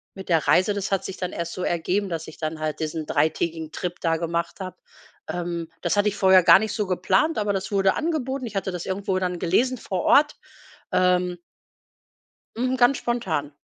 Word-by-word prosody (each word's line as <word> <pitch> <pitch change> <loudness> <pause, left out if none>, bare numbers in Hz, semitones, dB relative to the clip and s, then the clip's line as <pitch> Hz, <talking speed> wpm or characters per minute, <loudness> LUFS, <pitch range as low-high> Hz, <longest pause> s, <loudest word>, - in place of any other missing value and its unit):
mit 190 -1 -9
der 165 -3 +2
Reise, 185 +3 +4
das 200 0 -3
hat 195 - 0
sich 190 - -5
dann 180 -1 -3
erst 170 0 -4
so 185 - -4
ergeben, 185 +4 0
dass 165 -2 -4
ich 160 - -11
dann 155 0 -4
halt 155 -1 -3
diesen 155 0 -3
3-tägigen 160 +2 -1
Trip 175 +1 -4
da 165 -1 +1
gemacht 170 +2 -3
habe. 185 -2 -6 0.5
Ähm, 170 -2 -3
das 175 - 0
hatte 205 +1 +4
ich 205 - -6
vorher 190 -2 +6
gar 170 +1 +8
nicht 215 0 -2
so 210 -3 -1
geplant, 185 - +1
aber 205 -1 0
das 190 +1 -3
wurde 195 -1 +3
angeboten, 275 -5 -2
ich 215 - -10
hatte 195 -1 -1
das 180 -2 -5
irgendwo 190 0 -1
dann 180 -1 -2
gelesen 245 +10 +1
vor 190 -5 -3
Ort. 295 +1 +4 0.6
Ähm. 180 -1 +2 1.2
Mhm, 255 +2 0
Ganz 245 +2 +4
spontan. 175 -12 -2
185 Hz, 200 wpm, -24 LUFS, 170-205 Hz, 1.2 s, gar